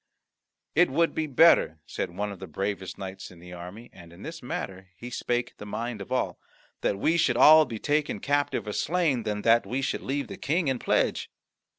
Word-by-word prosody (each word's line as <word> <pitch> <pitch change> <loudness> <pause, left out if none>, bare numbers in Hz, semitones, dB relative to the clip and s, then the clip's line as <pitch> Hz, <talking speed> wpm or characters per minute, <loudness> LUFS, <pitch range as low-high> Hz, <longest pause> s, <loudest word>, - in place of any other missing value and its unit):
"It 175 +3 +4
would 165 +5 +2
be 160 -1 -1
better," 140 - +5
said - - -4
one 100 +4 -4
of 100 - -9
the 95 - -8
bravest 95 +3 -4
knights 95 0 -7
in 90 - -15
the 90 +1 -12
army, 90 +7 -10
and 85 -2 -14
in 85 +4 -13
this 165 0 -7
matter 95 -6 -6
he 120 +5 -8
spake 120 0 -2
the - - -9
mind 115 +1 -4
of 100 - -9
all, 130 - -1 0.4
"that 100 - 0
we 160 +11 +2
should 120 -7 +2
all 155 +3 +8
be 115 -5 -6
taken 150 +5 0
captive 145 -2 0
or 105 - -4
slain, 160 - +1
than 105 -1 -3
that 115 0 +5
we 135 +2 -2
should - - -1
leave 140 +1 -2
the - - -8
King 160 +1 0
in 130 -2 -1
pledge." - - 0
120 Hz, 210 wpm, -27 LUFS, 95-145 Hz, 0.4 s, all